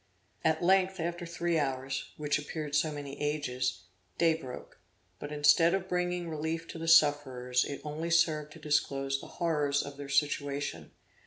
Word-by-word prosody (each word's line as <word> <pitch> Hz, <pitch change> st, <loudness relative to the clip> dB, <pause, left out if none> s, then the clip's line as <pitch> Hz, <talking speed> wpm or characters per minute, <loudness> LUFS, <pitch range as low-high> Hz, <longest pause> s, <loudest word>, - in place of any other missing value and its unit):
At 160 Hz, 0 st, +2 dB
length 190 Hz, +1 st, +3 dB
after 175 Hz, +1 st, -3 dB
three 170 Hz, -1 st, 0 dB
hours, 135 Hz, -1 st, -2 dB
which 150 Hz, -1 st, 0 dB
appeared 150 Hz, 0 st, -5 dB
so 150 Hz, +1 st, +2 dB
many 145 Hz, -1 st, -7 dB
ages, 125 Hz, -8 st, -1 dB, 0.3 s
day 165 Hz, -1 st, +4 dB
broke, 130 Hz, -6 st, -8 dB, 0.4 s
but 145 Hz, -, -6 dB
instead 150 Hz, +4 st, +5 dB
of 190 Hz, -1 st, -3 dB
bringing 180 Hz, -1 st, -1 dB
relief 160 Hz, +1 st, -3 dB
to 165 Hz, -, -7 dB
the 165 Hz, -, -4 dB
sufferers, 135 Hz, -6 st, +4 dB
it 140 Hz, -, -6 dB
only 155 Hz, +2 st, -4 dB
served 155 Hz, -3 st, +2 dB
to 160 Hz, -, -12 dB
disclose 135 Hz, -3 st, 0 dB
the -, -, -10 dB
horrors 150 Hz, -4 st, +1 dB
of 140 Hz, 0 st, -8 dB
their 140 Hz, -1 st, -7 dB
situation. 140 Hz, -, -1 dB
150 Hz, 160 wpm, -30 LUFS, 140-165 Hz, 0.4 s, instead